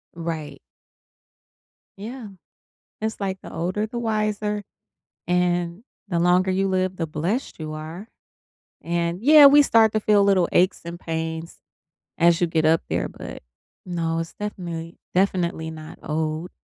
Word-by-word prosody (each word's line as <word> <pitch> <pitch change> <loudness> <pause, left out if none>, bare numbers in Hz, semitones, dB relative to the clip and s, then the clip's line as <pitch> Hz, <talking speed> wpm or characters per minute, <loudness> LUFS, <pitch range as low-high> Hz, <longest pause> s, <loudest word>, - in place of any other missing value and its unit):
Right. 165 -3 -5 1.4
Yeah. 230 +3 -7 0.7
It's 220 0 -3
like 190 -1 -3
the - - -10
older, 185 +6 -1
the 235 +2 -5
wiser, 210 -2 -1 0.6
and 175 +1 0 0.3
the 170 -3 0
longer 180 +2 +3
you 195 +1 +1
live, 185 0 0
the 165 - -2
blessed 170 - -3
you 155 -1 -5
are. 160 +7 -7 0.7
And, 170 +3 -2
yeah, 295 +1 +9
we 290 +1 +8
start 225 -5 +4
to 215 - +1
feel 205 -1 +4
little 190 -3 +3
aches 185 +2 +3
and 170 0 -7
pains, 160 0 -4 0.6
as 170 +1 +4
you 175 - +3
get 160 -1 +1
up 160 +1 +4
there, - - -1
but, - - -9 0.4
no, 165 -2 -1
it's 165 0 -5
definitely 170 -5 -6 0.2
definitely 175 -4 0
not 155 -1 -10
old. 155 +2 -2
180 Hz, 140 wpm, -23 LUFS, 165-205 Hz, 1.4 s, yeah